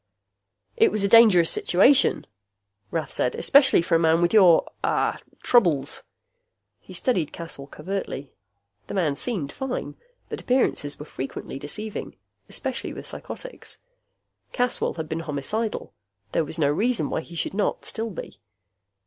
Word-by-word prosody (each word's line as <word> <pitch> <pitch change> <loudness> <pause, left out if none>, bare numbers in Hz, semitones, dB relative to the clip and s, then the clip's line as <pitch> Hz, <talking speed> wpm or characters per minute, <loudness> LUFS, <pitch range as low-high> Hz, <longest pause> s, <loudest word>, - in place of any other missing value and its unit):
"It - - +5
was 215 -1 0
a - - +3
dangerous 205 -6 +6
situation," 255 +10 +3 0.6
Rath 165 -2 -3
said. 125 - 0
"Especially 275 - +5
for 170 - -2
a 165 - +5
man 165 0 +3
with 175 +2 +1
your 185 -6 +6 0.2
ah - - +1 0.2
troubles." 160 - +2 0.8
He - - -13
studied 185 - 0
Caswell 165 -5 -8
covertly. 150 -4 -5 0.6
The - - -5
man 160 -7 +1
seemed 170 - -2
fine, 265 -1 -4 0.3
but - - -6
appearances 245 - 0
were 150 - -8
frequently 135 -1 -6
deceiving, 210 +9 -6 0.3
especially - - -4
with - - -8
psychotics. - - -8 0.8
Caswell 245 -1 0
had 160 -2 -5
been 160 +1 -3
homicidal; 165 +9 -3 0.4
there 160 - +1
was 160 - -4
no 145 -3 +2
reason 215 - 0
why - - -1
he 170 - -12
should 165 - -2
not 205 +1 -1
still 225 +1 -3
be. 150 - -9
175 Hz, 140 wpm, -24 LUFS, 150-220 Hz, 0.8 s, dangerous